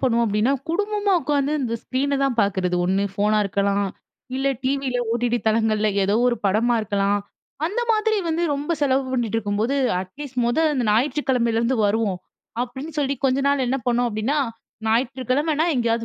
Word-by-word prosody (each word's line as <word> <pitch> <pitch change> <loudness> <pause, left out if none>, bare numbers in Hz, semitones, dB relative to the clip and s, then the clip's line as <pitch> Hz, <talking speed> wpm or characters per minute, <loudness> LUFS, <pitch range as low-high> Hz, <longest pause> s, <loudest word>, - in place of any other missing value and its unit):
பண்ணுவோம் 235 -2 +2
அப்டின்னா 210 +6 +1 0.2
குடும்பமா 410 +3 0
உட்காந்து 285 0 0
இந்த 230 -3 -2
ஸ்க்ரீன 280 +2 -1
தான் 275 -2 +1
பார்க்குறது 185 -3 0
ஒண்ணு 190 +2 +1
ஃபோனா 210 +2 +1
இருக்கலாம் 200 +1 0 0.5
இல்ல 270 +1 -1 0.2
டிவியில 265 -1 -1 0.2
OTT 240 0 0
தளங்கள்ல 215 -1 +2
ஏதோ 195 +2 +1
ஒரு 240 - 0
படமா 225 +5 +2
இருக்கலாம். 200 0 0 0.5
அந்த 420 +8 -2
மாதிரி 435 0 +2
வந்து 325 +1 0
ரொம்ப 290 +4 -2
செலவு 270 -1 +2
பண்ணிட்டு 235 -4 0
இருக்கும்போது 215 +4 -1 0.3
அட்லீஸ்ட் 255 +8 -8
மொத 240 +5 +1 0.2
இந்த 255 -3 0
ஞாயிற்றுக்கிழமையிலேருந்து 235 -1 +1
வருவோம் 205 -3 0 0.4
அப்டின்னு 265 +6 -6
சொல்லி 280 -1 +1
கொஞ்ச 265 0 +3
நாள் 280 -2 +2
என்ன 260 +2 +1
பண்ணோம் 245 0 +2
அப்டின்னா, 220 +7 -1 0.5
ஞாயிற்றுக்கிழமனா 265 +6 +1
எங்கேயாவது 230 -1 0
245 Hz, 150 wpm, -22 LUFS, 215-275 Hz, 0.5 s, கொஞ்ச